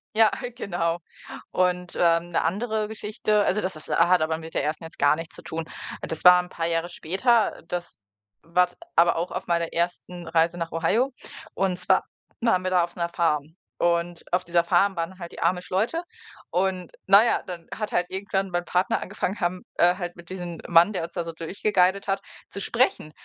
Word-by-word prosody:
Ja, 220 Hz, -1 st, +6 dB, 0.3 s
genau. 175 Hz, -2 st, -1 dB, 0.5 s
Und, 180 Hz, -1 st, 0 dB
ähm, 170 Hz, 0 st, +2 dB
'ne -, -, +1 dB
andere 215 Hz, +5 st, -1 dB
Geschichte 210 Hz, -1 st, 0 dB
also 210 Hz, +3 st, +1 dB
das 185 Hz, -, -2 dB
das 155 Hz, -, -11 dB
hat 175 Hz, +1 st, +4 dB
aber 160 Hz, 0 st, 0 dB
mit 160 Hz, 0 st, -10 dB
der -, -, 0 dB
1. 155 Hz, +2 st, -2 dB
jetzt 160 Hz, -, -10 dB
gar 145 Hz, +1 st, +5 dB
nichts 165 Hz, 0 st, -7 dB
zu -, -, -7 dB
tun. 165 Hz, 0 st, -4 dB, 0.4 s
Äh, -, -, -5 dB
das 160 Hz, -, -5 dB
war 180 Hz, 0 st, +10 dB
'n 180 Hz, -, -11 dB
paar 165 Hz, -2 st, -3 dB
Jahre 165 Hz, +1 st, -1 dB
später, 210 Hz, +8 st, +1 dB
das 175 Hz, -1 st, -5 dB, 0.4 s
war 180 Hz, +2 st, +2 dB
t 180 Hz, -, -21 dB, 0.2 s
aber 170 Hz, 0 st, +5 dB
auch 170 Hz, +2 st, -2 dB
auf -, -, -5 dB
meiner 170 Hz, -1 st, 0 dB
1. 175 Hz, 0 st, -3 dB
Reise 165 Hz, +1 st, +2 dB
nach 165 Hz, -1 st, -4 dB
Ohio, 225 Hz, +11 st, +1 dB, 0.4 s
und 190 Hz, -2 st, 0 dB
zwar 180 Hz, -, +3 dB, 0.4 s
waren 230 Hz, -6 st, +3 dB
wir 185 Hz, -, -1 dB
da 180 Hz, -2 st, +4 dB
auf 175 Hz, -, -6 dB
'ner 170 Hz, -1 st, 0 dB
Farm. 160 Hz, -2 st, -1 dB, 0.2 s
Und 170 Hz, 0 st, 0 dB
auf 180 Hz, -, +2 dB
dieser 170 Hz, 0 st, +2 dB
Farm 195 Hz, +2 st, +3 dB
waren 170 Hz, +3 st, -3 dB
halt 170 Hz, -2 st, -8 dB
die -, -, -10 dB
Amish-Leute 190 Hz, -, 0 dB, 0.5 s
und 185 Hz, -1 st, -1 dB, 0.2 s
na 200 Hz, +3 st, +8 dB
ja, -, -, +2 dB
dann 175 Hz, -2 st, -7 dB
hat 215 Hz, -1 st, -4 dB
halt 175 Hz, -, +2 dB
irgendwann 195 Hz, 0 st, -2 dB
mein 175 Hz, 0 st, -1 dB
Partner 180 Hz, +1 st, +1 dB
angefangen 195 Hz, +5 st, -3 dB
haben, 180 Hz, 0 st, -1 dB
äh, 175 Hz, +1 st, +4 dB
halt 175 Hz, -2 st, -5 dB
mit 175 Hz, 0 st, -13 dB
diesem 175 Hz, -3 st, -6 dB
Mann, 170 Hz, +4 st, +6 dB
der 175 Hz, -, -2 dB
uns 165 Hz, -, -7 dB
da 175 Hz, -, -2 dB
so 165 Hz, -, -5 dB
durchgeguidet 190 Hz, +3 st, +1 dB
hat, 195 Hz, -, 0 dB, 0.3 s
zu 200 Hz, -, -6 dB
sprechen. 235 Hz, -, +1 dB
175 Hz, 200 wpm, -25 LUFS, 170-190 Hz, 0.5 s, war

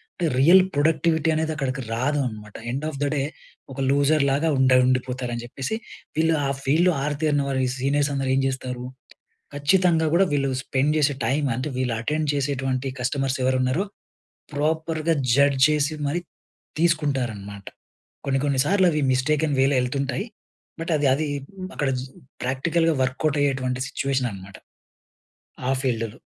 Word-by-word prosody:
అంటే 175 Hz, -, -2 dB
real 175 Hz, +7 st, +7 dB
productivity 160 Hz, +2 st, +2 dB
అనేది 160 Hz, 0 st, 0 dB
అక్కడికి 135 Hz, -2 st, -3 dB
రాదు 130 Hz, +6 st, 0 dB
అన్నమాట. 105 Hz, -3 st, -7 dB, 0.2 s
ఎండ్ 135 Hz, +4 st, -3 dB
ఆఫ్ 140 Hz, -, -7 dB
ద -, -, +2 dB
డే 145 Hz, -, 0 dB, 0.5 s
ఒక 135 Hz, -, -8 dB
లూజర్ 145 Hz, +2 st, +3 dB
లాగా 145 Hz, +4 st, +1 dB
ఉండ 130 Hz, -1 st, +4 dB
ఉండిపోతారు 130 Hz, -1 st, -1 dB
అని 120 Hz, -, -5 dB
చెప్పేసి, 135 Hz, -, -4 dB, 0.4 s
వీళ్ళు 160 Hz, 0 st, +3 dB
ఆ -, -, 0 dB
ఫీల్డ్‌లో 165 Hz, +7 st, +3 dB
ఆరితేరిన 145 Hz, 0 st, 0 dB
వారు, 135 Hz, -1 st, -1 dB
ఈ -, -, -1 dB
సీనియర్స్ 140 Hz, +2 st, +1 dB
అందరు 135 Hz, -1 st, -1 dB
ఏం 135 Hz, -, +2 dB
చేస్తారు? 130 Hz, -2 st, -4 dB, 0.7 s
ఖచ్చితంగా 165 Hz, +3 st, +3 dB
కూడా 190 Hz, +3 st, +5 dB
వీళ్ళు 140 Hz, -1 st, +1 dB
స్పెండ్ 140 Hz, +3 st, +1 dB
చేసే 145 Hz, -2 st, +2 dB
టైమ్, 140 Hz, +2 st, +1 dB
అంటే 130 Hz, +5 st, -3 dB
వీళ్ళు 125 Hz, -2 st, 0 dB
అటెండ్ 150 Hz, +5 st, -1 dB
చేసేటువంటి 135 Hz, -2 st, -1 dB
కస్టమర్స్ 135 Hz, +1 st, -1 dB
ఎవరున్నరో, 130 Hz, +8 st, +1 dB, 0.7 s
ప్రాపర్‌గా 160 Hz, +2 st, 0 dB, 0.2 s
జడ్జ్ 140 Hz, -1 st, +3 dB
చేసి 150 Hz, 0 st, +1 dB
మరి 165 Hz, +5 st, -1 dB, 0.6 s
తీసుకుంటారన్నమాట. 125 Hz, -12 st, -1 dB, 0.6 s
కొన్ని, 135 Hz, -1 st, +1 dB
కొన్ని 135 Hz, -2 st, +2 dB
సార్లు 190 Hz, +1 st, +3 dB
అవి 150 Hz, -2 st, 0 dB
మిస్టేకన్‌వేలో 140 Hz, 0 st, +2 dB
ఎళ్తుంటాయి. 135 Hz, +5 st, -2 dB, 0.6 s
బట్ 165 Hz, -, -3 dB
అది, 145 Hz, -, 0 dB
అది 150 Hz, +3 st, -1 dB, 0.5 s
అక్కడ 145 Hz, -, 0 dB
జీ 130 Hz, -, -7 dB, 0.4 s
ప్రాక్టికల్‌గా 160 Hz, +6 st, +1 dB
వర్కౌట్ 140 Hz, +3 st, 0 dB
అయ్యేటువంటి 130 Hz, -2 st, -1 dB
సిట్యుయేషన్ 135 Hz, -4 st, -1 dB
అన్నమాట, 95 Hz, 0 st, -11 dB, 1.1 s
ఆ -, -, +3 dB
ఫీల్డ్‌లో. 115 Hz, -3 st, -2 dB
140 Hz, 145 wpm, -24 LUFS, 130-155 Hz, 1.1 s, real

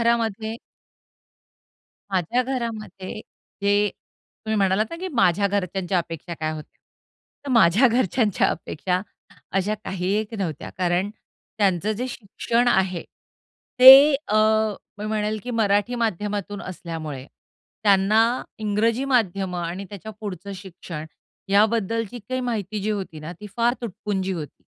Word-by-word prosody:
घरामध्ये 225 Hz, -1 st, 0 dB, 1.5 s
माझ्या 195 Hz, +7 st, +1 dB
घरामध्ये 220 Hz, -6 st, -5 dB, 0.4 s
जे 205 Hz, +1 st, +3 dB, 0.6 s
तुम्ही 220 Hz, 0 st, 0 dB
म्हणालात 195 Hz, +1 st, +3 dB
ना, 335 Hz, -, -5 dB
की 370 Hz, +2 st, -5 dB
माझ्या 200 Hz, -4 st, +3 dB
घरच्यांच्या 190 Hz, -2 st, -1 dB
अपेक्षा 170 Hz, 0 st, -5 dB
काय 155 Hz, 0 st, -1 dB
होत्या, 155 Hz, -1 st, -10 dB, 0.7 s
तर 280 Hz, -, -4 dB
माझ्या 230 Hz, +3 st, +6 dB
घरच्यांच्या 225 Hz, -2 st, +2 dB
अपेक्षा 180 Hz, +3 st, -2 dB, 0.5 s
अशा 195 Hz, +2 st, +1 dB
काही 185 Hz, 0 st, -2 dB
एक 220 Hz, +1 st, -7 dB
नव्हत्या. 160 Hz, -7 st, -4 dB
कारण 180 Hz, +2 st, +1 dB, 0.5 s
त्यांचं 200 Hz, +1 st, +2 dB
जे 245 Hz, +5 st, -3 dB
शिक्षण 235 Hz, +2 st, -1 dB
आहे, 190 Hz, -5 st, +1 dB, 0.8 s
ते 270 Hz, +3 st, +11 dB
अ, 215 Hz, -, +2 dB, 0.6 s
मी 210 Hz, -, -4 dB
म्हणेल 215 Hz, 0 st, -1 dB
की 250 Hz, -, -5 dB
मराठी 215 Hz, 0 st, +1 dB
माध्यमातून 205 Hz, -3 st, -2 dB
असल्यामुळे, 160 Hz, -7 st, -6 dB, 0.6 s
त्यांना 205 Hz, +1 st, +4 dB, 0.4 s
इंग्रजी 220 Hz, +4 st, +1 dB
माध्यमं 195 Hz, -8 st, 0 dB
आणि 175 Hz, +4 st, -4 dB
त्याच्या 210 Hz, +2 st, -8 dB
पुढचं 200 Hz, -1 st, -6 dB
शिक्षण, 175 Hz, -4 st, -8 dB, 0.4 s
याबद्दलची 220 Hz, +2 st, +1 dB
काही 255 Hz, 0 st, -1 dB
माहिती 215 Hz, -4 st, -3 dB
जी 215 Hz, -, -1 dB
होती 190 Hz, -7 st, -4 dB
ना, 155 Hz, +3 st, -6 dB
ती 210 Hz, -, -7 dB
फार 235 Hz, +1 st, +3 dB
तुटपुंजी 200 Hz, -3 st, -3 dB
होती. 160 Hz, -5 st, -7 dB
205 Hz, 125 wpm, -23 LUFS, 185-225 Hz, 1.5 s, ते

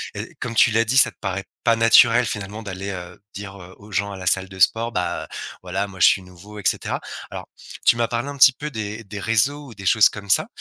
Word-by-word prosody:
et -, -, -7 dB
comme 115 Hz, -2 st, -6 dB
tu 115 Hz, -, +5 dB
l'as 115 Hz, +1 st, +2 dB
dit, 125 Hz, +4 st, 0 dB
ça 135 Hz, -, +7 dB
te -, -, -35 dB
paraît 95 Hz, -1 st, -4 dB, 0.2 s
pas 115 Hz, -, +4 dB
naturel, 115 Hz, +1 st, +5 dB
finalement, 105 Hz, 0 st, -5 dB
d'aller, 100 Hz, 0 st, -6 dB
heu, 90 Hz, 0 st, -9 dB
dire, 100 Hz, 0 st, -9 dB
heu, 90 Hz, +1 st, -14 dB
aux 105 Hz, +1 st, -15 dB
gens 100 Hz, +1 st, -2 dB
à -, -, -8 dB
la 95 Hz, -, -9 dB
salle 95 Hz, +1 st, +3 dB
de 95 Hz, -1 st, -12 dB
sport: 115 Hz, +5 st, +2 dB
«Bah, 90 Hz, -, -3 dB, 0.3 s
voilà, 95 Hz, +2 st, -3 dB
moi, 95 Hz, -2 st, -13 dB
je -, -, +7 dB
suis 95 Hz, -, +3 dB
nouveau» 95 Hz, +3 st, -14 dB
et -, -, -10 dB
cetera. -, -, 0 dB, 0.3 s
Alors -, -, -9 dB, 0.4 s
tu -, -, +5 dB
m'as 115 Hz, -1 st, 0 dB
parlé 120 Hz, +4 st, -3 dB
un 140 Hz, -, -8 dB
petit 135 Hz, -1 st, +7 dB
peu 150 Hz, +3 st, -7 dB
des 110 Hz, 0 st, -6 dB
des 100 Hz, 0 st, -8 dB
réseaux 135 Hz, +8 st, +1 dB
ou 115 Hz, -, -12 dB
des 95 Hz, 0 st, -10 dB
choses 110 Hz, +2 st, +5 dB
comme 100 Hz, -1 st, -10 dB
ça, -, -, +4 dB
105 Hz, 255 wpm, -21 LUFS, 95-115 Hz, 0.4 s, ça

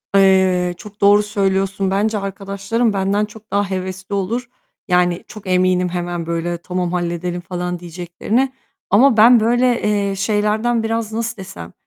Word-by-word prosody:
Eee, 190 Hz, -2 st, +4 dB
çok 210 Hz, -1 st, -13 dB
doğru 205 Hz, +1 st, +6 dB
söylüyorsun. 195 Hz, -1 st, 0 dB
Bence 210 Hz, +2 st, +1 dB
arkadaşlarım 195 Hz, +3 st, -2 dB
benden 195 Hz, +2 st, +1 dB
çok 215 Hz, -1 st, -16 dB
daha 200 Hz, 0 st, 0 dB
hevesli 190 Hz, +1 st, -4 dB
olur. 235 Hz, +6 st, -2 dB, 0.4 s
Yani 180 Hz, -1 st, +2 dB
çok 215 Hz, -4 st, -11 dB
eminim 180 Hz, 0 st, +2 dB
hemen 175 Hz, -1 st, -3 dB
böyle 170 Hz, +1 st, -2 dB
"Tamam 180 Hz, 0 st, -3 dB
halledelim." 175 Hz, 0 st, -2 dB
falan 180 Hz, 0 st, -4 dB
diyeceklerine 180 Hz, +9 st, -2 dB, 0.4 s
ama 230 Hz, +4 st, +5 dB
ben 235 Hz, +2 st, +7 dB
böyle, 240 Hz, +2 st, +2 dB
eee, 200 Hz, -2 st, 0 dB
şeylerden 215 Hz, +3 st, 0 dB
biraz 225 Hz, -1 st, -2 dB
nasıl 230 Hz, 0 st, -3 dB
desem, 85 Hz, -, -9 dB
195 Hz, 140 wpm, -19 LUFS, 180-215 Hz, 0.4 s, ben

